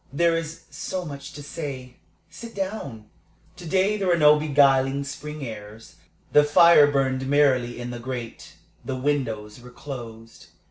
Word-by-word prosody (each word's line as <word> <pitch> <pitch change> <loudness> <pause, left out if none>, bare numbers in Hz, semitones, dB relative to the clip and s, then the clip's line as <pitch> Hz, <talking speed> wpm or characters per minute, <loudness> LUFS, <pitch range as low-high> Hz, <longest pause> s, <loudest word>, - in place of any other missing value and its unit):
"There 170 +4 +2
is 165 0 -5
so 185 -1 -5
much 140 -2 -8
to 145 - -9
say. 135 -4 -7 0.3
Sit 230 +6 -11
down." 190 - -5 0.5
To 175 - -9
day 195 +5 +2
there 195 -2 -2
were 175 -1 +3
no 150 -1 +6
beguiling 140 -2 +3
spring 150 +1 -7
airs. 110 -1 -10 0.4
The 150 - +7
fire 150 -1 +6
burned 135 -1 0
merrily 130 -4 +2
in 120 0 -5
the 120 - -6
grate; 120 -2 -7 0.3
the 135 - -4
windows 125 -6 -2
were 125 - -12
closed. 115 -4 -10
140 Hz, 150 wpm, -24 LUFS, 125-155 Hz, 0.5 s, The